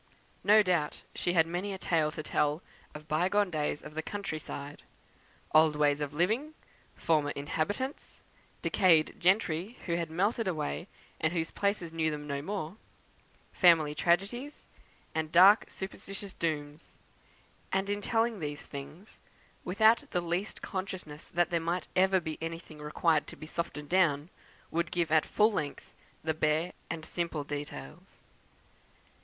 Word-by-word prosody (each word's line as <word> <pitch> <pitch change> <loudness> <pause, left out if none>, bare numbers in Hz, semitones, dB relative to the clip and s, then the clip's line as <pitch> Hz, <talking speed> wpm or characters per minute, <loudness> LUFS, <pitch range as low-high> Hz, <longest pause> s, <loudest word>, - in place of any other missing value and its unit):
No 215 +1 +7
doubt 170 -6 0
she 175 - -1
had 165 -2 +5
many 180 +4 -3
a - - -4
tale 160 -4 +1
to 155 0 -6
tell 150 +3 0 0.3
of 150 0 -9
by 165 +4 +1
gone 205 -2 +2
days 150 -2 -1
of 150 - -9
the 160 - -2
country 195 -3 -4
side; 145 -1 -7 0.7
old 155 -1 +6
ways 145 -1 +2
of 145 -1 -2
living, 220 - 0 0.4
former 155 -3 +2
inhabitants, 205 - -3 0.4
decayed 165 -5 +4
gentry, 185 +2 +1
who 170 - -1
had 170 -2 -2
melted 200 +6 0
away, 75 - -2 0.3
and 160 +1 +1
whose 165 -2 -1
places 200 -5 -1
knew 160 -1 +1
them 150 -1 -5
no 140 -1 -3
more; 190 +1 -4 0.8
family 165 -5 +5
tragedies, 200 - 0 0.5
and 160 -1 -2
dark 190 +5 +8
superstitious 195 0 -7
dooms; 150 -2 -4 0.7
and 190 +1 +1
in 205 0 -1
telling 225 0 +1
these 150 -2 -5
things, 150 +8 -10 0.4
without 220 +5 +4
the 180 - 0
least 175 +4 -3
consciousness 185 -6 -5
that 175 0 +1
there 170 - +2
might 170 +2 -2
ever 190 +1 +4
be 160 -3 -5
anything 165 -1 -6
requiring 150 +1 +1
to - - -10
be 155 - -9
softened 150 -3 -4
down, 165 -3 +2 0.4
would 170 +1 0
give 170 -3 -1
at 160 -1 +4
full 215 +2 +4
length 150 -8 -4 0.3
the 160 0 0
bare 155 +3 +1 0.2
and 160 -1 -4
simple 170 -3 -2
details. 145 - -8
165 Hz, 150 wpm, -31 LUFS, 150-190 Hz, 0.8 s, dark